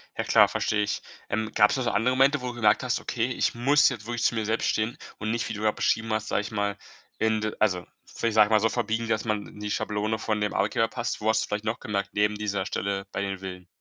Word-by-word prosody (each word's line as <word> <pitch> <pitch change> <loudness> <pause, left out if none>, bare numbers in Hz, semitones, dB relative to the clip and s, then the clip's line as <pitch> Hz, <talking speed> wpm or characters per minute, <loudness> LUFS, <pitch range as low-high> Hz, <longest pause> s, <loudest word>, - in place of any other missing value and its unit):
Ja - - -1
klar, - - +6
verstehe 105 -1 0
ich. 105 - -2 0.3
Ähm, 110 0 -1
gab 105 - +5
es - - 0
noch 130 - -1
so 120 - 0
andere 115 +5 +2
Momente, 135 +2 +4
wo 125 - -4
du 125 - -4
gemerkt 110 -2 +3
hast: 125 -1 0
„Okay, 120 0 -1
ich 125 - 0
muss 140 +5 +4
jetzt 120 -5 -6
wirklich 120 0 -3
zu - - +2
mir 110 -1 -1
selbst 110 +2 0
stehen.“ 110 +2 -1 0.2
Und 110 0 -2
nicht, 115 0 -1
wie - - -3
du 105 - -6
grade 110 -1 +2
beschrieben 110 0 0
hast, 110 0 -1
sage - - +1
ich 105 - -7
mal, 100 -1 -1 0.4
in 110 -1 +1
also, 95 -5 +1 0.2
vielleicht 115 -2 -3
sage 105 -1 +7
ich - - -8
mal 110 - +6
so 115 +2 +2
verbiegen, 115 0 -1
dass 110 0 0
man 105 -2 -1
in - - -13
die 105 0 -4
Schablone 105 +2 -1
von 110 -1 -1
dem 105 - 0
Arbeitgeber 105 +3 +1
passt. 120 0 -3
Wo 110 - +1
hast 110 0 +3
du - - -5
vielleicht 105 +1 -3
noch 115 +1 -1
gemerkt 100 -2 -3
neben 105 0 +2
dieser 100 -2 -2
Stelle 100 -1 -2
bei - - -3
den 95 -1 -3
Villen? 90 -1 -8
110 Hz, 275 wpm, -26 LUFS, 105-115 Hz, 0.4 s, sage